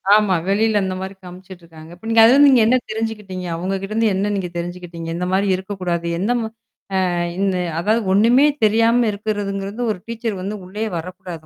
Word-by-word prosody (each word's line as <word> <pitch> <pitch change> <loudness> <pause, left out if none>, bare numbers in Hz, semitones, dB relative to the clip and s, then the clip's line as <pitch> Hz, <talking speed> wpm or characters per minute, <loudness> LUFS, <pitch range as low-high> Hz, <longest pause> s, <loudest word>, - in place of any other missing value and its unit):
ஆமா. 210 -3 +3
வெளில 210 +1 +2
அந்தமாரி 190 +1 -4
காமிச்சுட்டுருக்காங்க. 175 -3 -12
இப்ப 180 - -17
நீங்க 225 0 +5
அதுலருந்து 280 +5 +7
நீங்க 250 - +5
என்ன 255 +2 +4
தெரிஞ்சுக்கிட்டீங்க? 210 -5 -4
அவுங்ககிட்டருந்து 195 +5 -1
என்ன 205 +2 0
நீங்க 185 -3 -3
தெரிஞ்சுக்கிட்டீங்க? 170 -1 -6
இந்தமாரி 185 +3 0
இருக்கக்கூடாது. 185 -3 -3
எந்த 205 +6 0
ம - - -2 0.6
அ - - -1 0.3
இந்த 195 -2 +1 0.2
அதாது 215 +6 +1
ஒன்னுமே 240 +8 +5 0.2
தெரியாம 230 +2 +3
இருக்கிறதுங்கிறது 200 +1 -3
ஒரு 185 - -11
டீச்சர் 225 -4 -4
வந்து 210 +2 -4
உள்ளயே 210 +4 -4
வரக்கூடாது 175 -1 -8
195 Hz, 150 wpm, -20 LUFS, 180-220 Hz, 0.6 s, அதுலருந்து